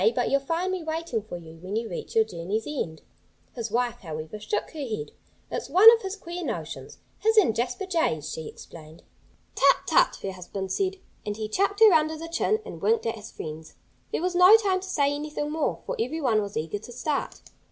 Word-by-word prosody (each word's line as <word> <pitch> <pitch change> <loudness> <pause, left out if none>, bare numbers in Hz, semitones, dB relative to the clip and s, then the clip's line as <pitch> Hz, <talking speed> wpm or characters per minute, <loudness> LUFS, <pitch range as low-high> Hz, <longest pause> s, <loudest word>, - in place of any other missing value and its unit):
But - - 0
you'll 275 - +4
find 335 +7 -1
me 375 -1 -2
waiting 320 -7 -2
for 205 -4 -7
you 165 -1 -12
when 185 +4 -5
you 225 +1 -1
reach 175 - -7
your 225 -1 +5
journey's 195 +3 -3
end." 170 - -4 0.5
His 230 -2 -4
wife, 240 +1 0
however, 155 +3 -6
shook 210 0 -2
her 315 - -9
head. 215 - -4 0.4
"It's - - -4
one 430 +5 +10
of 460 - +1
his 385 0 -4
queer 350 -2 -6
notions - - -5 0.2
his 445 +1 +2
and 355 - +5
Jasper 250 +9 -2
Jay's," 325 - 0
she 160 - -5
explained. 160 0 -12 0.5
"Tut, - - +4
tut!" - - +4
her 195 - -2
husband 190 +1 -6
said. 385 - 0 0.3
And 210 0 -4
he 215 -1 -3
chucked 400 - 0
her 440 -2 +9
under 315 0 +3
the 330 +1 -7
chin 425 +6 +1
and - - -8
winked 455 0 +2
at 230 - 0
his 220 -1 -10
friends. 155 0 -8 0.4
There - - -1
was 365 0 0
no 365 +5 +8
time 390 -4 +1
to 380 - -8
say 285 -4 +2
anything 295 0 -3
more, 315 0 -1
for - - -3
everyone 275 - +1
was 200 -1 -5
eager 160 +6 -2
to 245 - -11
start. 280 +4 -2
255 Hz, 210 wpm, -26 LUFS, -, 0.5 s, one